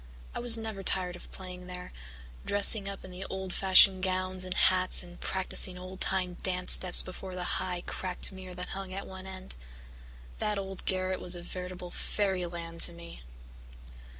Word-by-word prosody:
I - - -5
was 235 -1 +5
never 220 -3 -6
tired 180 -2 +1
of 180 - -12
playing 180 -1 -10
there, 180 0 -9 0.5
dressing 200 0 +5
up 195 -1 -8
in 185 - -11
the 180 +1 -7
old 190 -1 -5
fashioned 190 0 +6
gowns 185 0 +1
and 185 0 -3
hats 185 0 +5
and 175 0 -14
practising 185 -1 +2
old 185 +1 -10
time 180 -2 +1
dance 180 -1 +1
steps 180 -1 +4
before 185 0 -9
the 180 - -5 0.2
high, 180 -1 -4
cracked 185 +1 -3
mirror 185 -1 -10
that 180 +1 -6
hung 195 -1 -7
at 195 - -6
one 190 0 -10
end. 185 - -8 0.8
That 210 -1 -1
old 195 -1 -7
garret 185 0 -1
was 180 - +2
a 175 - -8
veritable 180 0 -8
fairyland 175 -5 -3
to 175 - +5
me. 170 - -12
185 Hz, 175 wpm, -29 LUFS, 180-190 Hz, 0.8 s, fashioned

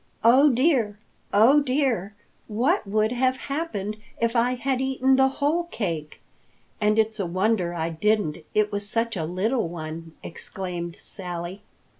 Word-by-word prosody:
"Oh 260 +6 +7
dear! 245 -6 +2 0.3
Oh 235 +8 +6
dear! 255 -8 0 0.3
What 240 - +1
would 215 +2 +1
have 255 +1 +1
happened 225 -10 -3 0.2
if 230 +1 0
I 245 +2 +2
had 265 0 -1
eaten 265 0 +2
the 265 0 +5
whole 295 +5 0
cake? 165 - -4 0.6
And 210 +1 +3
it's 220 0 +1
a 190 - -1
wonder 185 -1 0
I 165 0 -1
didn't, 175 -1 0 0.2
it 210 0 +2
was 205 0 -2
such 230 +1 0
a 165 -4 -2
little 190 +6 0
one!" 165 -1 -7
exclaimed 175 -1 -6
Sally. 180 0 -6
215 Hz, 145 wpm, -25 LUFS, 180-260 Hz, 0.6 s, Oh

